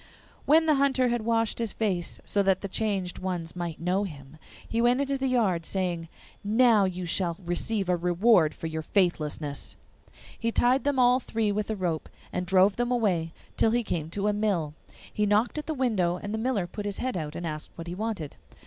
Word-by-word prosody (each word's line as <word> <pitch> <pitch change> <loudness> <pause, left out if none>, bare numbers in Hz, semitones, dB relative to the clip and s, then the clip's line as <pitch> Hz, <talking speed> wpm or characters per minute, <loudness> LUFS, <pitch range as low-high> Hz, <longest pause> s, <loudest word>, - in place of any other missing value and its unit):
When 320 +3 +6
the 310 - +4
Hunter 265 -2 +3
had 240 -1 0
washed 230 -1 +1
his 230 -3 -2
face, 185 -6 -2
so 205 - +2
that 190 -1 +2
the 200 - -3
changed 195 -3 -2
ones 180 -3 -4
might 170 -3 -4
know 180 +4 +1
him, 145 -4 -9 0.3
he 230 - 0
went 245 +2 +3
into 280 0 0
the 270 0 -1
yard, 210 -10 +1
saying, 175 -2 -2 0.4
'Now 220 0 +4
you 185 -1 -3
shall 170 -1 0
receive 195 +3 -1
a 180 - +3
reward 175 0 +3
for - - -8
your 160 0 -3
faithlessness.' 155 -5 -1 0.6
He 230 0 0
tied 255 +4 +3
them 285 -2 +1
all 250 0 +5
three 225 -4 -1
with 210 +1 -2
a 220 - 0
rope, 175 -5 -2 0.2
and 180 0 -2
drove 190 +1 +4
them 240 0 0
away 185 -9 +1 0.3
till - - +4
he 240 +2 +1
came 160 -6 -3
to 200 +4 -2
a 210 - +2
mill. 195 -8 0 0.4
He 210 0 +1
knocked 215 +8 +2
at 300 - -7
the 315 - -2
window, 210 -10 +1
and 205 +3 -6
the 220 - -1
miller 225 -5 0
put 205 +4 -7
his 200 - -3
head 255 -3 -2
out 155 -3 -4
and 175 - -4
asked 155 -2 -4
what 165 - -7
he 170 - -5
wanted. 195 -6 -4
200 Hz, 210 wpm, -27 LUFS, 175-230 Hz, 0.6 s, When